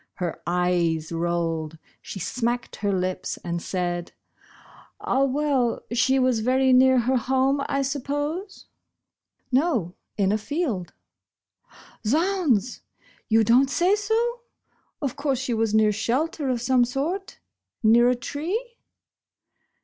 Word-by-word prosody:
Her 175 -3 -4
eyes 175 -2 0
rolled. 165 -2 -2 0.2
She - - -8
smacked 240 +6 -2
her 205 -1 -1
lips 185 -1 -2
and 170 0 -2
said: 175 -2 -3 0.9
"Ah, 275 - +1
well, 275 -3 0
she 255 +3 +2
was 255 -3 +2
very 260 +3 +3
near 260 0 +5
her 255 +3 +1
home, 265 +3 +1
I 275 0 0
suppose 290 +8 -3 0.3
?" - - -61
" - - -49
No, 255 - +1 0.2
in 195 -2 +2
a 215 - +1
field." 240 - -3 0.6
" - - -24
Z'hounds! 300 - +1 0.5
You 225 0 +4
don't 245 +5 +4
say 355 +8 +3
so? 455 +3 -1 0.6
Of 270 -4 -2
course 280 -2 -1
she 260 -1 -2
was 220 -1 0
near 215 -1 +4
shelter 265 +7 -1
of 245 -2 -1
some 255 -1 +4
sort? 305 +11 -3 0.4
Near 235 +2 +6
a 250 - +2
tree 395 - -4
250 Hz, 130 wpm, -24 LUFS, 205-285 Hz, 0.9 s, Near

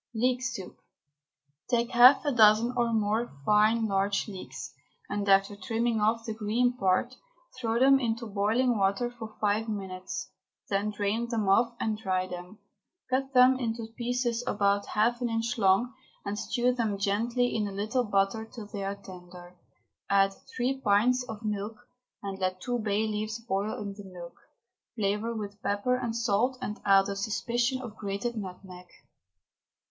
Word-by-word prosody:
LEEK 250 +2 +1
SOUP. 250 -8 -5 0.9
Take 240 0 +1
half 250 +4 +7
a 290 - +2
dozen 225 0 +5
or 240 -1 +1
more 220 +1 0
fine 215 +2 +4
large 200 0 0
leeks, 185 -10 -8 0.3
and 205 0 -2
after 195 +1 +4
trimming 225 +1 -1
off 225 +2 +1
the 220 - -3
green 230 +3 +1
part, 195 +4 +1 0.4
throw 230 -2 -1
them 270 +1 +6
into 230 -2 -2
boiling 220 +3 +1
water 200 +5 +1
for 225 -3 -9
five 215 +2 +1
minutes, 190 -3 -5 0.4
then 200 +1 0
drain 210 +3 -1
them 220 -4 -1
off 230 +5 +3
and 215 -1 -1
dry 185 -3 0
them. 180 +2 -8 0.5
Cut 265 +1 0
them 255 +1 +6
into 225 -2 -4
pieces 245 -1 -1
about 200 0 +1
half 235 +3 +1
an 240 - 0
inch 230 +1 -2
long, 195 +6 +3 0.3
and 205 +1 -3
stew 250 0 +1
them 225 -5 -1
gently 230 +5 0
in 210 -2 0
a - - -5
little 215 +6 -1
butter 205 +1 0
till 230 -4 -8
they 205 -1 -6
are 195 +1 -2
tender. 180 -2 -12 0.5
Add 195 0 +4 0.2
three 260 +2 0
pints 230 +5 +3
of 220 0 -7
milk, 210 +1 -3 0.5
and 195 -1 -5
let 185 0 -1
two 245 +3 -2
bay 215 0 0
leaves 215 +1 -3
boil 210 -2 -2
in 205 -1 -5
the 195 -1 -11
milk, 175 -1 -9 0.6
flavour 215 +2 -1
with 205 -1 -6
pepper 205 +5 0
and 235 -2 -3
salt, 235 +2 +1
and 210 -4 -5
add 195 -1 +5
a 200 - -3
suspicion 240 +5 -1
of 225 -3 -8
grated 205 +4 -3
nutmeg. 185 -3 -8
215 Hz, 160 wpm, -28 LUFS, 200-240 Hz, 0.9 s, half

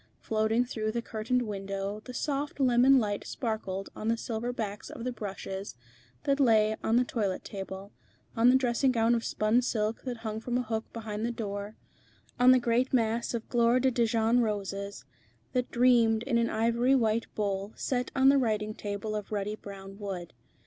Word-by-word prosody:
Floating 220 +2 +1
through 215 -3 -2
the 235 +1 -3
curtained 230 +3 -1
window 195 -1 -4
the 250 - -8
soft 285 +2 -2
lemon 260 +1 +5
light 205 -4 0
sparkled 205 -5 -3
on 215 - -5
the 230 0 +2
silver 230 +1 -3
backs 210 -4 -5
of 230 - -8
the 250 - -1
brushes 195 - -6 0.5
that 280 0 +1
lay 220 -4 +4
on 225 - +2
the 245 - +5
toilet 205 -6 -2
table, 195 0 -7 0.4
on 230 +2 +5
the 255 - +6
dressing 260 +1 +2
gown 230 -1 +3
of 230 -1 0
spun 215 +3 +2
silk 220 -2 -1
that 250 -2 -4
hung 215 0 -2
from 245 +2 -2
a 250 - 0
hook 220 -1 -4
behind 220 -2 -5
the 235 - 0
door, 205 -2 -5 0.6
on 250 +1 +7
the 255 - +8
great 240 +1 +1
mass 235 -1 +1
of 230 - -5
gloire 235 +1 +3
de 260 +1 +2
Dijon 230 0 +2
roses, 200 - -3 0.5
that 250 -1 0
dreamed 235 -2 +4
in 240 -2 +1
an 230 - +1
ivory 235 +4 +2
white 225 -2 +1
bowl 200 -1 -2
set 250 -2 -1
on 270 0 +6
the 275 0 +5
writing 215 -3 0
table 205 +1 -4
of 210 -1 -5
ruddy 210 0 -2
brown 195 -1 -10
wood. 190 -4 -5
225 Hz, 185 wpm, -29 LUFS, 210-245 Hz, 0.6 s, the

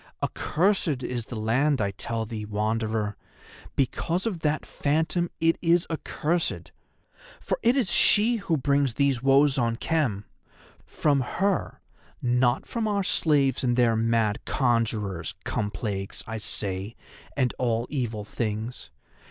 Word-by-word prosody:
Accursed 165 -6 0
is 120 -3 -3
the 120 - -7
land, 130 +7 +1
I 100 -1 0
tell 115 +3 -3
thee, 110 -1 -5
Wanderer; 105 0 -1 0.6
because 170 - 0
of 205 -7 -2
that 155 -1 -1
Phantom 160 +4 0
it 165 0 +2
is 170 0 +3
accursed. 165 +1 -2 0.7
For - - -2
it 240 +4 +3
is 230 -9 +2
she 225 +3 +5
who 175 -6 0
brings 140 -2 +1
these 140 -3 +1
woes 135 +1 +4
on 115 -1 +1
Khem; 120 -8 -1 0.6
from 145 -2 +1
her, 190 +9 -1 0.4
not 125 0 +1
from 230 -2 -2
our 200 -2 0
slaves 145 -8 +2
and 120 -1 +1
their 120 -2 +4
mad 115 -1 +1
conjurers, 110 - -1
come 105 - -2
plagues, 95 -1 -4
I 115 0 -5
say, 100 0 0 0.4
and 130 -3 +1
all 120 -2 0
evil 115 -7 -2
things. 110 +2 -4
125 Hz, 135 wpm, -26 LUFS, 110-155 Hz, 0.7 s, she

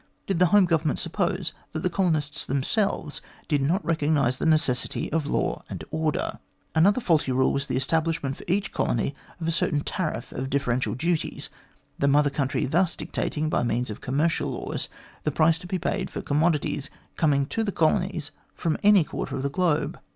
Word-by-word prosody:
Did 190 -4 -1
the 180 - +6
Home 200 +2 +6
Government 160 -4 +1
suppose - - -1 0.2
that 160 - -2
the - - +3
colonists 160 -6 0
them 135 0 -1
selves 195 - 0 0.3
did 145 -2 +1
not 170 +9 +1
recognise 145 -6 +2
the - - 0
necessity 155 -6 +1
of 155 -2 0
law - - 0
and - - -6
order? 155 -1 -1 0.3
Another 195 +9 +4
faulty 160 - +2
rule 130 +1 +3
was 140 0 -1
the - - -1
establishment 160 0 0
for - - -12
each 195 +3 0
colony 120 +4 0 0.3
of 165 - -3
a - - +2
certain 160 -2 +1
tariff 155 -8 -3
of 130 +1 -4
differential 130 -3 0
duties, 165 +4 -2 0.5
the 140 - +2
Mother 145 0 +4
Country 135 -2 0
thus 170 +5 +2
dictating 155 +1 -2
by - - +1
means 120 0 -1
of 105 - -8
commercial 150 +6 0
laws - - -4 0.3
the - - 0
price 160 +2 +3
to 180 - -9
be 185 0 -1
paid - - -2
for - - -5
commodities 150 -2 +1 0.3
coming 140 -3 +2
to 225 +10 -1
the 205 - -1
colonies 170 -2 +1 0.2
from 165 -3 -1
any 205 -3 +6
quarter - - -4
of 135 - -3
the 140 - 0
globe. 160 -1 0
155 Hz, 185 wpm, -26 LUFS, 140-170 Hz, 0.5 s, the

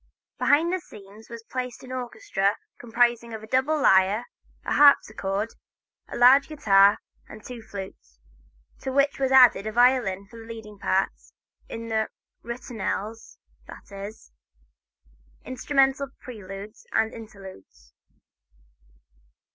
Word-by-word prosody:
Behind 330 +5 +3
the 370 - 0
scenes 210 - -15
was 230 -1 -10
placed 250 -1 -5
an 255 - -10
orchestra 220 -5 -2 0.2
comprising 235 -1 0
a 220 0 -9
double 265 +7 +1
lyre, 195 -1 +4 0.4
a - - -1
harpsichord, 215 -7 +3 0.5
a - - -7
large 260 +3 +6
guitar 200 -9 +4 0.3
and 215 - -12
two 245 -2 -8
flutes, 190 - -10 0.6
to 265 - -4
which 280 +1 +1
was 265 -1 0
added 250 -6 +6
a - - -2
violin 240 -5 +2
for 230 +3 -13
the 225 - -12
leading 215 -3 -10
part 195 -1 +1 0.6
in 230 0 -7
the 220 -1 0 0.3
ritornels, 230 -2 -5 0.3
that - - -13
is, 200 - -9 1.1
instrumental 270 +1 +1
preludes 205 -2 -10
and 220 0 +1
interludes. 190 - -13
225 Hz, 115 wpm, -25 LUFS, 200-255 Hz, 1.1 s, large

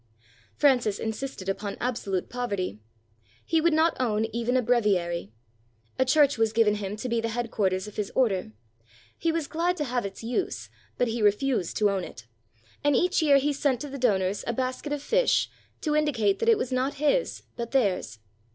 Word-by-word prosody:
Francis 245 -8 +3
insisted 220 -2 -5
upon 200 +1 -3
absolute 215 -7 -2
poverty. 200 - -3 0.7
He 325 -1 +2
would 340 +1 +3
not 320 +2 +3
own 220 -3 +1
even 235 +2 +1
a - - +3
breviary. 190 - +1 0.7
A 260 - +4
church 280 -1 +4
was 225 -1 +2
given 220 -2 +4
him 195 +1 -3
to 215 - -5
be 235 -1 0
the 230 - -2
headquarters 210 -5 -1
of 210 - -11
his 210 -2 -2
order. 195 - +1 0.6
He 330 - 0
was 325 -2 -1
glad 345 +4 -1
to 300 - -1
have 250 -3 -1
its 200 +2 -7
use, 250 - -3 0.3
but 245 - +1
he 225 0 -2
refused 210 -1 +1
to 210 -1 +3
own 195 -2 -1
it; 115 - -10 0.6
and 290 -1 +3
each 360 +6 +2
year 290 -3 +5
he 290 +2 +1
sent 275 -3 +1
to 290 - -5
the 275 0 -7
donors 200 -5 +1
a 235 - 0
basket 255 +4 -3
of 290 -1 -3
fish - - +2 0.3
to 300 -2 0
indicate 245 -10 +2
that 460 - +2
it 455 - +6
was 260 - -3
not 260 +3 0
his 300 - 0
but 235 -1 -4
theirs. 200 - 0
240 Hz, 190 wpm, -27 LUFS, 205-285 Hz, 0.7 s, it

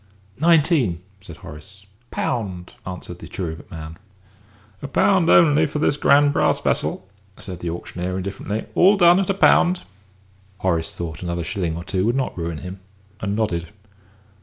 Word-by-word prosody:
"Nineteen!" 150 - +3 0.2
said 85 -5 -11
Horace. 95 +6 -12 0.2
"Pound!" 95 -7 -3
answered 90 -1 -7
the - - -9
cherubic 85 -3 -6
man. 80 -2 -9 0.8
"A 140 - -5
pound 180 +4 +3
only 150 -3 +6
bid - - -4
for - - -4
this 150 -1 +2
grand 145 0 +4
brass - - +2
vessel," 95 - -1 0.3
said 90 -3 -7
the 85 - -4
auctioneer, 90 +2 -4
indifferently. 100 +3 -4
"All 195 +3 +5
done 175 0 +6
at 195 - -1
a 195 - +1
pound?" 180 -2 +4 0.7
Horace 85 -4 -1
thought 80 -3 -6
another 85 -1 -3
shilling 90 -4 -2
or 85 - -6
two 95 +1 -1
would 120 - +1
not 135 -1 -1
ruin 85 -2 -4
him, 90 +4 -8 0.4
and 100 -1 -2
nodded. 85 -6 -1
95 Hz, 160 wpm, -22 LUFS, 85-145 Hz, 0.8 s, only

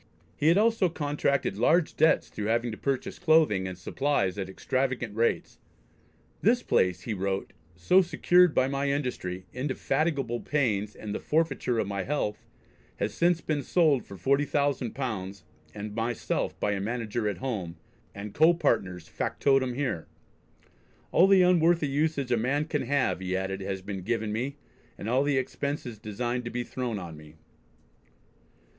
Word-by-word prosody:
He 150 - 0
had 170 +3 +6
also 220 -3 +3
contracted 145 - -1
large 160 +7 +3
debts 160 - +3
through 105 -1 -4
having 115 +1 +1
to - - -5
purchase 135 -2 -2
clothing 155 - +3
and 95 -1 -6
supplies 95 -2 0
at 95 -1 -3
extravagant 125 +1 -2
rates. 115 +1 0 0.8
"This - - +3
place," 90 -1 +2
he 115 - -3
wrote, 95 0 -2 0.2
"so 135 - +4
secured 180 -1 +3
by 130 - +3
my 140 +1 -1
industry; 125 -10 -3
indefatigable 135 -1 -1
pains, 105 -9 -1
and 105 -2 -6
the - - -3
forfeiture 150 -6 0
of 110 - +1
my 100 0 -3
health, 105 -3 -3 0.5
has 100 0 -2
since 170 -1 +2
been 150 -2 -1
sold 145 - +3
for 100 - -11
forty 140 +5 +2
thousand 140 -5 -1
pounds 100 -8 -4 0.3
and 105 +4 -7
myself 115 +1 -2
by 105 - 0
a 100 -1 -1
manager 115 0 -2
at 100 - -4
home, 105 -11 -4 0.4
and 100 0 -7
Co 160 +3 +5
partners' 90 - 0
factotem 135 -3 +1
here. 130 - -2 1.0
All 180 - +6
the 195 -2 +6
unworthy 170 -3 +4
usage 140 -1 0
a 120 - +3
man 140 +6 0
can 150 -2 -1
have," 140 -8 +1
he 95 0 -2
added, 95 0 -3
"has 95 -1 -4
been 100 -1 -5
given 110 +2 -2
me, 130 +6 -2 0.4
and 100 - -6
all 125 +3 +2
the 145 -1 +1
expenses 130 -3 -3
designed 120 +4 -3
to - - -3
be 120 +1 -3
thrown 120 -2 -3
on 85 -4 -7
me." 75 0 -14
125 Hz, 160 wpm, -28 LUFS, 100-145 Hz, 1.0 s, had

